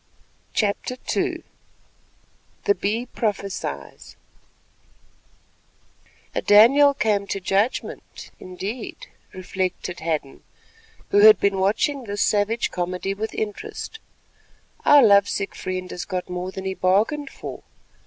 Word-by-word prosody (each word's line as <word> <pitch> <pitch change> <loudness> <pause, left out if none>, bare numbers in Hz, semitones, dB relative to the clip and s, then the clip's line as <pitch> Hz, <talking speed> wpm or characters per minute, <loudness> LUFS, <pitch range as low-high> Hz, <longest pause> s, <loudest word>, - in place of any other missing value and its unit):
CHAPTER 215 +4 -1 0.2
II - - -1 1.2
THE 405 - +4
BEE 225 - -2
PROPHESIES 200 -3 -4 2.2
"'A - - -1
Daniel 275 +8 +6
come 210 -6 0
to 195 - -3
judgment' 195 +6 -2
indeed," 195 +6 -7 0.3
reflected 185 -1 -4
Hadden, 155 -4 -3 0.7
who 205 - +5
had 215 -1 +8
been 200 -1 +1
watching 235 +8 0
this 205 -1 -1
savage 215 +3 +1
comedy 180 +2 -2
with 215 +2 -5
interest; 220 - -5 0.9
"our 290 -2 +8
love 200 -2 +6
sick 200 - -3
friend 185 0 -5
has 175 - -5
got 185 -2 -4
more 180 +1 -4
than 190 0 -7
he 190 - -1
bargained 215 +11 +1
for. - - -8
200 Hz, 110 wpm, -23 LUFS, 185-220 Hz, 2.2 s, had